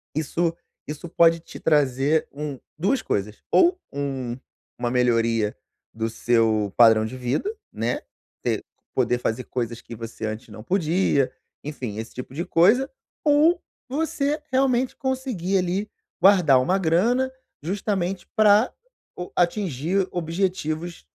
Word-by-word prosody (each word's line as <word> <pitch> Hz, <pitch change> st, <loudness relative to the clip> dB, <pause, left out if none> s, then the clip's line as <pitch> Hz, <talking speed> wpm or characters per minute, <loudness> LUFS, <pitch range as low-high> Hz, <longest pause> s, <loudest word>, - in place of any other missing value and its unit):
isso 165 Hz, +2 st, 0 dB, 0.3 s
isso 150 Hz, +3 st, -6 dB
pode 165 Hz, 0 st, +4 dB
te -, -, -11 dB
trazer 145 Hz, 0 st, +2 dB
um 145 Hz, -2 st, -5 dB, 0.2 s
2 200 Hz, +11 st, +1 dB
coisas, 105 Hz, +1 st, -3 dB
ou 360 Hz, +1 st, +5 dB, 0.2 s
um 135 Hz, -4 st, -3 dB, 0.4 s
uma 120 Hz, -1 st, -1 dB
melhoria 115 Hz, -3 st, +2 dB, 0.4 s
do 110 Hz, 0 st, -2 dB
seu 110 Hz, -3 st, +1 dB
padrão 110 Hz, -2 st, +6 dB
de 130 Hz, +3 st, -6 dB
vida, 130 Hz, -, -1 dB, 0.2 s
né, -, -, -1 dB, 0.4 s
você -, -, 0 dB, 0.3 s
poder 125 Hz, -1 st, +2 dB
fazer 120 Hz, +1 st, -2 dB
coisas 120 Hz, -2 st, -3 dB
que 120 Hz, -, -11 dB
você 115 Hz, -1 st, -6 dB
antes 110 Hz, +1 st, -5 dB
não 110 Hz, 0 st, -10 dB
podia, 170 Hz, -4 st, +1 dB, 0.3 s
enfim, 130 Hz, -8 st, -5 dB
esse 110 Hz, +1 st, -6 dB
tipo 125 Hz, +1 st, -8 dB
de 170 Hz, +5 st, -3 dB
coisa 205 Hz, +11 st, +4 dB, 0.4 s
ou 305 Hz, +4 st, +4 dB, 0.3 s
você 295 Hz, 0 st, -1 dB
realmente 260 Hz, -1 st, +2 dB
conseguir, 255 Hz, -9 st, -1 dB
ali, 185 Hz, +4 st, -1 dB, 0.3 s
guardar 180 Hz, -9 st, +6 dB
uma 180 Hz, +9 st, +1 dB
grana 230 Hz, +10 st, +2 dB, 0.3 s
justamente 190 Hz, 0 st, -2 dB
pra 215 Hz, +1 st, +5 dB, 0.4 s
o 180 Hz, -, -6 dB
atingir 180 Hz, 0 st, +1 dB
objetivos, 170 Hz, -, -2 dB
160 Hz, 125 wpm, -24 LUFS, 125-195 Hz, 0.4 s, padrão